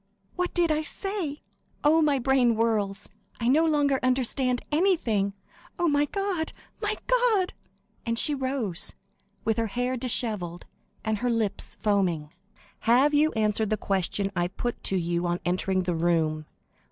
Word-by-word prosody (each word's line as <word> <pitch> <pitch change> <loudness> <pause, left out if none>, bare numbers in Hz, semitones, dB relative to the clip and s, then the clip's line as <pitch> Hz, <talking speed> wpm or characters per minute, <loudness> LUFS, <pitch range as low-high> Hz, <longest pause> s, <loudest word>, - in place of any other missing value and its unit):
"What 360 0 -2
did 345 -2 +3
I 310 0 +1
say? 350 -3 -2 0.4
Oh, 315 +2 +5
my 295 -3 +3
brain 255 -2 +3
whirls; 215 -3 0 0.3
I 235 - -1
no 305 +6 +4
longer 290 -3 +2
understand 255 0 +1
anything. 295 - +2 0.4
Oh, 350 - +1
my 290 -1 +3
God, 385 -2 -2 0.3
my 420 0 -1
God!" 475 -7 +2 0.5
And 230 0 -1
she 295 - +5
rose, 260 -9 -1 0.5
with 225 0 +1
her 225 - 0
hair 245 +4 -2
dishevelled, 215 -8 -1 0.4
and 220 -1 -1
her 245 - 0
lips 225 -4 -1
foaming. 180 -7 0 0.6
"Have 265 +5 +5
you 305 +2 +4
answered 215 -1 +1
the 215 - +1
question 195 0 -1
I 175 -1 +1
put 240 +6 -4
to 195 - +1
you 175 0 -1
on 175 +1 -1
entering 185 +1 0
the 180 -1 -1
room? 160 -2 0
240 Hz, 150 wpm, -27 LUFS, 195-295 Hz, 0.6 s, Oh